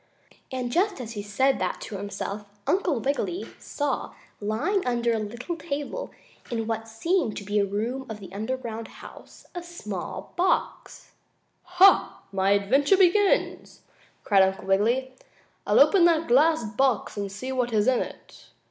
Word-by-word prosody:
And 250 -2 -3
just 380 +5 +1
as 235 -3 -6
he 210 -3 -5
said 260 +7 +1
that - - -2
to 210 - -7
himself, 200 +1 -5 0.2
Uncle 355 -9 +1
Wiggily 285 - -2
saw, 285 -3 -3 0.2
lying 280 - 0
under 240 -1 +1
a 225 - 0
little 240 +10 -5
table, 295 - -5 0.4
in 225 -2 -2
what 225 0 -3
seemed 230 - -1
to - - -5
be 205 +1 0
a 200 - +3
room 230 +7 -3
of 220 -1 -6
the 190 -2 -11
underground 225 +1 -4
house, - - -14
a 350 - -5
small 215 - -7
glass - - -34
box. 365 +1 -1 0.6
"Ha! 385 +2 +5
My 195 0 +1
adventure 270 - +3
begins!" 390 +2 +2 0.4
cried 200 -2 +4
Uncle 190 0 +1
Wiggily. 235 +7 +1 0.5
"I'll - - +4
open 380 -4 +6
that 330 -1 +3
glass 305 +3 +4
box 230 +1 0
and 200 -1 -4
see 255 +7 -5
what 250 -2 -1
is 210 0 +2
in 260 -2 +4
it." - - -9
240 Hz, 155 wpm, -26 LUFS, 210-310 Hz, 0.6 s, open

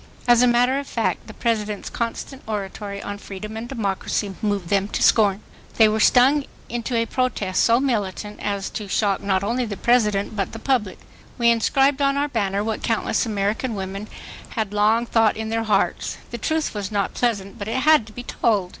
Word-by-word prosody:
As 240 0 +6
a 250 - +5
matter 245 +3 +3
of 280 - -7
fact 230 - -2
the 220 - -9
President's 215 -3 -1
constant 240 +3 -4
oratory 200 -1 -5
on 205 0 -5
freedom 210 +2 -8
and 230 +2 -6
democracy 200 -3 -2
moved 205 -5 -1
them 200 -1 +2
to - - -2
scorn. 205 -2 +4 0.4
They 220 - +7
were 215 +1 0
stung 270 +5 +5 0.2
into 240 +1 -3
a 230 0 +2
protest 215 -6 0
so 230 +1 +4
militant 210 -5 -2
as 200 -1 -3
to 210 - -5
shock 200 0 +1
not 195 -1 0
only 240 +5 0
the 210 -4 -4
President 210 -4 +2
but 195 -3 -2
the - - -5
public. 225 -5 0 0.4
We 235 -2 +4
inscribed 270 +5 +2
on 275 0 +2
our 290 +1 0
banner 200 -5 -1
what 220 0 -3
countless 225 +1 0
American 215 +3 -1
women' 195 +2 -5 0.5
had 215 -3 -2
long 215 +3 +3
thought 225 -2 +2
in 220 0 -4
their 225 0 -1
hearts. 215 - 0
The 235 - -5
truth 315 +7 -1
was 205 -2 -4
not 200 -2 -1
pleasant 205 -5 -1
but 200 - -5
it 225 +3 -1
had 305 -6 +5
to - - -12
be 245 - -7
told. 205 -7 0
220 Hz, 195 wpm, -22 LUFS, 200-240 Hz, 0.5 s, They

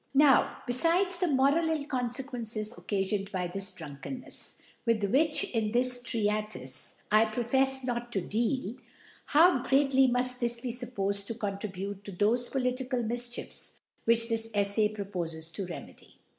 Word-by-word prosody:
Now, 280 -2 +4
befides 345 +8 +3
the 360 - +1
moral 285 +3 +2
ill 310 -3 -1
Confequcnccs 245 -4 -3
occafioned 195 -2 -2
by 185 -2 -2
this 195 +2 -2
Drunkennefs, 185 - -5 0.3
with 230 -3 +1
which, 300 +9 +3
in 220 -2 -1
this 250 0 +3
Treatife, 210 - -2 0.2
I 215 +1 +6
profefs 265 +4 +2
not 240 -1 -3
to 195 - 0
deal 230 +4 -1
•, - - -19 0.5
how 320 -2 +5
greatly 270 0 +3
muft 250 0 +2
this 240 -1 +1
be 245 0 -4
fuppofed 200 -5 0
to 230 - -4
contribute, 200 -2 -5
to 200 - -7
thofe 225 +6 +1
political 255 -1 -1
Mifchiefs 240 +2 0 0.3
which 230 0 +4
this 225 -1 0
Eflay 205 +1 +2
propofcs 165 -5 -4
to 195 0 -4
remedy 175 - -10
235 Hz, 145 wpm, -29 LUFS, 205-255 Hz, 0.5 s, I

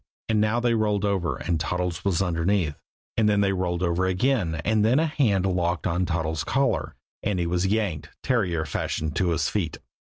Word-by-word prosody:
And 110 -2 +2
now 110 +3 +2
they 120 -1 +2
rolled 105 -2 +1
over, 90 -8 0
and 85 -2 -1
Toddles 90 +1 -2
was 95 -2 +1
underneath; 85 -2 +1 0.4
and 110 -2 +3
then 105 -1 +3
they 100 -1 +2
rolled 90 -1 -1
over 90 +1 +1
again; 95 -2 +1
and 110 -1 +3
then 115 +5 +4
a 160 - +3
hand 115 - +1
locked 90 -2 0
on 90 +1 0
Toddles' 80 -2 -1
collar, 135 0 0 0.3
and 100 -2 -1
he 85 - 0
was 90 +2 0
yanked, 100 -8 -1
terrier 90 -10 +1
fashion, 75 +1 -2
to 90 +4 0
his 85 - +1
feet. 85 -7 -2
95 Hz, 190 wpm, -25 LUFS, 85-105 Hz, 0.4 s, then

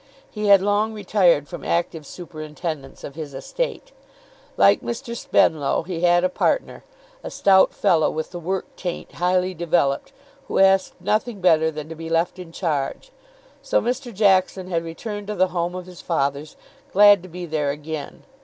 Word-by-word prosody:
He 210 -1 -3
had 200 -2 +7
long 205 +2 +1
retired 180 -7 +2
from 175 - -8
active 165 -3 -2
superintendence 155 -3 -7
of 140 - -7
his 150 -2 -7
estate. - - -4 0.7
Like - - +5
Mr. 235 0 -5
Spenlow, 155 -11 +2
he 175 -1 -5
had 175 0 +4
a - - +4
partner, 340 - -1 0.4
a - - -5
stout 190 -1 +4
fellow 160 -3 +2
with 160 0 -4
the 175 - -6
work 185 +3 -2
taint 175 -2 -5
highly 180 +1 0
developed, 160 -5 0 0.4
who - - -2
asked 195 0 +4
nothing 215 +2 -1
better 160 -3 +4
than 155 -1 -7
to 165 - -7
be 165 0 -8
left 165 +2 0
in 175 -2 -9
charge. 160 - -3 0.5
So - - +1
Mr. 250 +1 -3
Jackson 190 -2 +2
had 165 -1 0
returned 205 +5 -6
to 210 - -3
the 185 -1 +2
home 175 0 -2
of 180 -1 -6
his 180 -1 -12
fathers, 140 -2 -2 0.4
glad 205 -1 +7
to 185 - -12
be 175 +1 -7
there 155 -3 -1
again. 150 +1 -6
175 Hz, 170 wpm, -22 LUFS, 160-195 Hz, 0.7 s, had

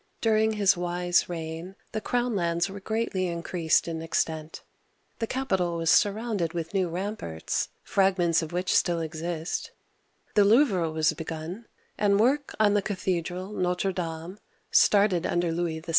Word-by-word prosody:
During 220 -1 +2
his 200 -3 +3
wise 175 0 +1
reign 165 +2 -6 0.2
the 215 - -3
crown 245 -1 0
lands 170 0 0
were 200 - -7
greatly 200 -3 -1
increased 170 -1 0
in 165 -1 -3
extent, 160 -1 -2 0.6
the 225 - -1
capital 190 -11 -1
was 165 -1 +2
surrounded 205 -5 +2
with 170 0 -4
new 190 -3 +1
ramparts, 175 - -3
— - - -43
fragments 180 -4 +2
of 160 - -5
which 180 +1 0
still 170 -1 +2
exist, 165 +1 -3 0.3
— - - -40
the 205 - +5
Louvre 205 - +4
(loo'vr*) - - -4
was 160 +1 +2
begun, 165 +7 -6 0.3
and 200 -1 +3
work 275 +5 +2
on 210 -2 +4
the 205 - +3
cathedral 185 -1 -3
Notre 180 0 0
Dame 170 +2 -5 0.3
(started 200 -4 +4
under 175 -1 0
Louis 165 -1 -2
VII. 165 - -12
180 Hz, 160 wpm, -27 LUFS, 165-205 Hz, 0.6 s, the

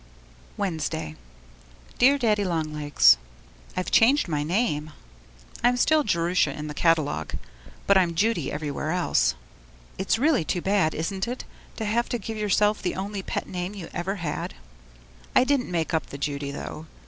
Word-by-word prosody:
Wednesday 160 - -3 0.8
Dear 270 +3 +6
Daddy 215 -5 +2
Long 160 -4 -1
Legs, 145 - +5 0.6
I've 185 - -2
changed 265 +4 +5
my 150 -3 -1
name. 155 -2 0 0.7
I'm 245 +1 +4
still 310 +4 +4
'Jerusha' 170 - +1
in 150 - -5
the 150 - -5
catalogue, 160 -2 +1 0.5
but 200 -1 +5
I'm 170 -3 +1
'Judy' 200 -6 +1
everywhere 150 0 -3
else. 180 +1 +2 0.6
It's 190 +3 +1
really 280 - +3
too 175 - -1
bad, 190 -3 +1
isn't 190 +5 -2
it, 245 +2 -4 0.3
to 220 - -4
have 230 +3 0
to 240 - -1
give 220 0 -6
yourself 210 0 +2
the 180 - -2
only 195 +1 -4
pet - - -4
name 180 +2 -4
you 180 -5 -7
ever 185 +3 -2
had? 165 - -4 0.8
I - - +7
didn't 265 -1 +1
quite - - -9
make 165 -1 -1
up 160 - 0
the 140 - -8
Judy 140 0 -3
though. 155 +2 -7
180 Hz, 160 wpm, -25 LUFS, 155-215 Hz, 0.8 s, I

